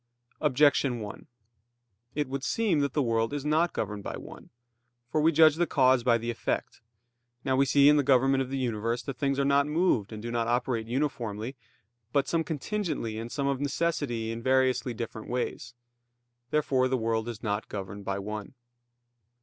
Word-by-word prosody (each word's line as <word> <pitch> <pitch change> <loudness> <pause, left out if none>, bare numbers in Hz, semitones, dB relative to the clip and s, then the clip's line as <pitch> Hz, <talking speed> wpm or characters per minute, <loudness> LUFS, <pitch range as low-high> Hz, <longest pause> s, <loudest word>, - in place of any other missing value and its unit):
Objection 140 -3 +3
1: 105 -2 -8 0.9
It 150 -1 0
would 135 0 -4
seem 210 -9 +1
that 140 -2 0
the 145 - +2
world 115 +1 0
is 145 -1 -3
not 160 +3 +2
governed 105 -1 -3
by - - -5
one. - - -11 0.6
For 155 - +2
we 160 +2 +5
judge 155 -1 +6
the 175 0 +2
cause 130 -3 +3
by 120 -1 +4
the 115 +1 -3
effect. 115 - -3 0.6
Now, 130 -1 +2
we 135 +1 +3
see 140 +2 +5
in 150 0 +7
the - - +4
government 135 0 +3
of 130 - -3
the 135 - -2
universe 115 -1 -1
that 135 -3 -6
things 140 -1 0
are 140 - +1
not 140 +1 +3
moved 150 - +1
and 110 - -6
do 120 +2 -5
not 115 -1 0
operate 120 -1 0
uniformly, 120 -3 -2 0.6
but 140 +1 +1
some 165 +4 +1
contingently 160 - -3
and 115 +1 -6
some 140 0 -2
of 140 -1 0
necessity 140 -6 -1
in 115 0 -5
variously 130 -1 +2
different 110 -1 -6
ways. 120 -2 -3 0.7
Therefore 135 -4 +2
the 130 0 0
world 115 0 -1
is 115 -1 -8
not 105 -1 -2
governed 100 0 -6
by 100 0 -2
one. 105 +4 -6
130 Hz, 180 wpm, -28 LUFS, 115-145 Hz, 0.9 s, in